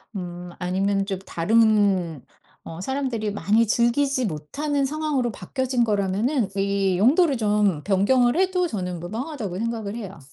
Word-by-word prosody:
음 175 -1 -6
아니면 195 +2 0
좀 195 -2 -2
다른 195 - +2 0.4
어 165 +1 -8
사람들이 250 -4 -2
많이 215 +3 +2
즐기지 255 +3 +1
못하는 275 - -2
상황으로 290 -5 -1
바뀌어진 255 +6 -1
거라면은 210 +4 0
이 195 -1 +1
용도를 285 - +4
좀 205 -7 +1
변경을 240 - +3
해도 370 -1 +2
저는 180 - -4
무방하다고 215 - -5
생각을 225 -2 -3
해요. 195 -6 -7
215 Hz, 315 characters per minute, -23 LUFS, 190-260 Hz, 0.4 s, 용도를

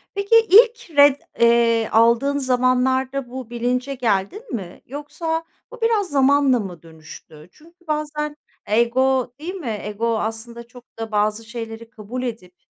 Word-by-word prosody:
Peki, 400 +3 +1
ilk 450 -6 +5
ret, 285 -1 +6 0.2
eee, 235 -1 +3
aldığın 235 +5 +3
zamanlarda 255 0 0
bu 255 -2 -8
bilince 250 +3 -2
geldin 245 - -2
mi 180 -5 -8
yoksa 320 +4 -4 0.3
bu - - -12
biraz 435 -5 +1
zamanla 275 -2 +3
mı 185 -5 -7
dönüştü? 160 0 -14
Çünkü 335 +2 -23
bazen 300 0 -3 0.3
ego 245 +3 +1
değil 355 +5 -6
mi? 235 - -4
Ego 220 +2 -2
aslında 230 +2 -6
çok 245 0 -15 0.2
da 225 -1 -5
bazı 210 +2 0
şeyleri 225 -1 -8
kabul 230 +3 -7
edip, 220 -7 -6
250 Hz, 135 wpm, -21 LUFS, 225-290 Hz, 0.3 s, ret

